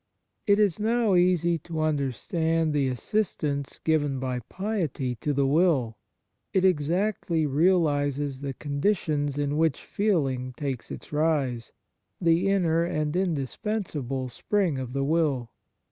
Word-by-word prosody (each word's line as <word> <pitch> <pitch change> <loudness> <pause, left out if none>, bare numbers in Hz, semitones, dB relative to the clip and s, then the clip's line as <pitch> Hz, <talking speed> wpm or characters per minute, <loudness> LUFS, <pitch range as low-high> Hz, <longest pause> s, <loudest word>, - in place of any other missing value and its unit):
It 200 0 +5
is 205 -4 +2
now 225 -1 +2
easy 175 -2 +3
to 160 +1 -4
understand 155 +2 0
the 140 -2 +2
assistance 140 - -2
given 145 -4 +1
by 130 -1 -2
piety 180 - -2
to 145 +6 -2
the 140 -1 +1
will; 140 -6 +2 0.6
it 190 -1 +3
exactly 170 0 +1
realizes 145 -3 +1
the 140 -2 -4
conditions 145 -1 -1
in 145 0 0
which 160 -3 +1
feeling 135 -11 0
takes 135 -5 -4
its - - -9
rise, 145 -7 0 0.5
the 170 +2 +3
inner 170 -4 +2
and 155 -2 -1
indispensable 150 - -2
spring 175 - 0
of 125 -1 -5
the 135 0 0
will. 140 -6 0
155 Hz, 125 wpm, -26 LUFS, 140-180 Hz, 0.6 s, It